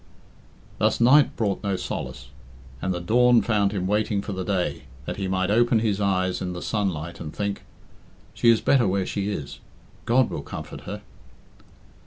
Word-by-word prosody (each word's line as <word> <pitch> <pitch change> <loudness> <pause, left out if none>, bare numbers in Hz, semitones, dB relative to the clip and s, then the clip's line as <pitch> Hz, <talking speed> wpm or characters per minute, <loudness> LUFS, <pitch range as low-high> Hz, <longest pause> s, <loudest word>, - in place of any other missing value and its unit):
Thus - - +2
night 130 +5 +5
brought 100 -4 -1
no 100 -2 -1
solace, 60 -7 -5 0.5
and 95 - -1
the 90 - -2
dawn 120 +6 +4
found 105 -3 +2
him 95 -3 -2
waiting 105 +1 0
for - - -5
the 95 0 -3
day, 90 -6 -2 0.2
that - - -4
he 95 -1 -2
might 95 +1 0
open 120 +1 +4
his 105 -2 0
eyes 95 -2 0
in 90 -1 -3
the 90 - -6
sunlight 85 -6 -2
and 75 -2 -6
think, 100 +2 -3 0.7
"She 120 - +3
is 115 -1 +5
better 125 -6 +3
where 95 0 0
she 100 +1 -2
is; 70 -9 -5 0.5
God 125 +2 +3
will - - -4
comfort - - -8
her." - - -6
100 Hz, 175 wpm, -24 LUFS, 95-110 Hz, 0.7 s, night